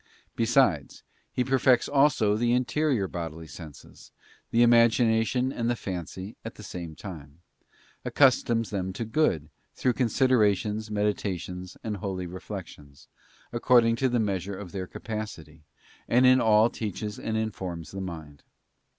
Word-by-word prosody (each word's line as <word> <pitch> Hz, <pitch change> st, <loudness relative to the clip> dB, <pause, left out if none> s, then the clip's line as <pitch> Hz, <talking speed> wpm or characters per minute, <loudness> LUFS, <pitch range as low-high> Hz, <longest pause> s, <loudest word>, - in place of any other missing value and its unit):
Besides, 115 Hz, -, +2 dB, 0.3 s
He 125 Hz, -, 0 dB
perfects 130 Hz, -2 st, +3 dB
also 135 Hz, -7 st, +3 dB
the 120 Hz, +2 st, +1 dB
interior 125 Hz, -3 st, +1 dB
bodily 80 Hz, -2 st, -6 dB
senses, 80 Hz, 0 st, -12 dB, 0.4 s
the 120 Hz, +1 st, +4 dB
imagination 120 Hz, +2 st, +3 dB
and 115 Hz, 0 st, -1 dB
the 120 Hz, -, +1 dB
fancy, 95 Hz, 0 st, -6 dB
at 115 Hz, -, -7 dB
the 105 Hz, -, -11 dB
same 85 Hz, -5 st, -7 dB
time; 80 Hz, -5 st, -10 dB, 0.6 s
accustoms 120 Hz, -4 st, +3 dB
them 95 Hz, -2 st, -2 dB
to 115 Hz, -, -4 dB
good, 110 Hz, -, +1 dB, 0.3 s
through 125 Hz, -, +1 dB
considerations, 110 Hz, -4 st, +1 dB
meditations, 95 Hz, -3 st, -3 dB
and 105 Hz, -2 st, -3 dB
holy 95 Hz, -2 st, -4 dB
reflections, 85 Hz, -6 st, -9 dB, 0.4 s
according 120 Hz, -1 st, +4 dB
to 130 Hz, +1 st, +1 dB
the 120 Hz, -1 st, +1 dB
measure 100 Hz, -2 st, -2 dB
of 95 Hz, -3 st, -8 dB
their 95 Hz, -2 st, -5 dB
capacity, 85 Hz, -10 st, -7 dB, 0.4 s
and 125 Hz, +2 st, +4 dB
in 130 Hz, 0 st, +6 dB
all 110 Hz, +1 st, +4 dB
teaches 105 Hz, -1 st, -5 dB
and 110 Hz, 0 st, -2 dB
informs 95 Hz, -6 st, -4 dB
the 95 Hz, -, -5 dB
mind. 80 Hz, -6 st, -8 dB
105 Hz, 135 wpm, -27 LUFS, 90-120 Hz, 0.6 s, in